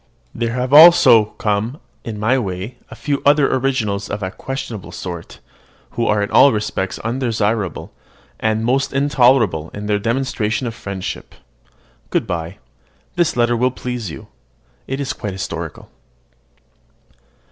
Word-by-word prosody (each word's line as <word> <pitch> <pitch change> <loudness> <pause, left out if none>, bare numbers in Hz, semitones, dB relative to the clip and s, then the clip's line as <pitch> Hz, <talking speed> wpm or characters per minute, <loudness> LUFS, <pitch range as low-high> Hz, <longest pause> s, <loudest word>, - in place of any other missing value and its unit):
There 115 0 -2
have 125 +2 -2
also 155 -8 +8
come 110 +5 -1 0.2
in 110 -2 -6
my 120 +5 +2
way 100 +3 -5
a - - -10
few 145 -2 -2
other 145 0 +4
originals 115 -7 -1
of 100 0 -4
a 95 - -3
questionable 110 -4 -6
sort, 85 -2 -7 0.5
who 115 - -1
are 105 -1 +2
in 100 - -4
all 140 - +7
respects 105 -3 -2
undesirable, 115 - -2 0.5
and 110 0 0
most 130 +3 0
intolerable 125 - +3
in 105 0 -6
their 105 -1 +1
demonstration 115 0 -1
of 115 - -3
friendship. 100 -4 -6 0.7
Good - - 0
bye. 85 +2 -4 0.6
This 175 -7 +1
letter 120 0 +2
will 125 +2 +2
please 125 -4 -5
you: - - -10 0.6
it 135 +1 -3
is 135 -3 -2
quite 105 -2 -5
historical. 85 -3 -6
115 Hz, 135 wpm, -19 LUFS, 100-130 Hz, 0.7 s, also